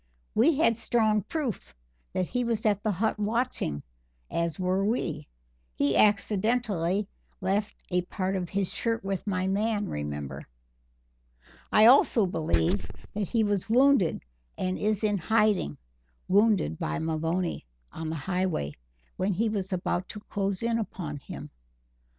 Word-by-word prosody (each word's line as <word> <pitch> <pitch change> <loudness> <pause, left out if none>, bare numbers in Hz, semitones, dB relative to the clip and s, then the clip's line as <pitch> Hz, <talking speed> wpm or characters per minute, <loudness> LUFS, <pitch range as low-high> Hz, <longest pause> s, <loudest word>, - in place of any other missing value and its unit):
We 285 +8 +4
had 230 -8 +3
strong 220 -2 +2
proof 275 - -4 0.4
that 185 - 0
he 245 0 0
was 230 -2 -1
at 205 -2 +2
the 215 - 0
hut 215 +3 0
watching, 210 - -1 0.5
as 170 -1 -1
were 185 +1 +1
we; 165 -9 -1 0.5
he 140 -1 +1
accidentally 205 -2 +2 0.3
left 200 +2 -1 0.2
a 180 0 +2
part 185 +2 -2
of 180 -2 -2
his 195 -2 -1
shirt 230 0 -1
with 195 +1 -3
my 185 -2 0
man, 210 +1 0
remember. 75 -2 -5 1.2
I 215 - +6
also 240 -3 +6
believe 120 - 0 0.2
that 205 -2 -2
he 230 +2 +2
was 205 0 0
wounded 250 - +4 0.3
and 185 0 -1
is 215 0 +1
in 210 -2 +2
hiding 210 - +2 0.5
wounded 200 - +3
by 75 - -2
Maloney, 165 - -1 0.2
on 160 -1 -5
the 160 - -2
Highway, 180 - -1 0.4
when 195 +2 +1
he 220 +5 +1
was 200 -3 -2
about 180 0 -1
to 210 - -7
close 200 -1 -2
in 230 0 +1
upon 170 -8 -4
him." 140 - -9
195 Hz, 140 wpm, -28 LUFS, 175-220 Hz, 1.2 s, I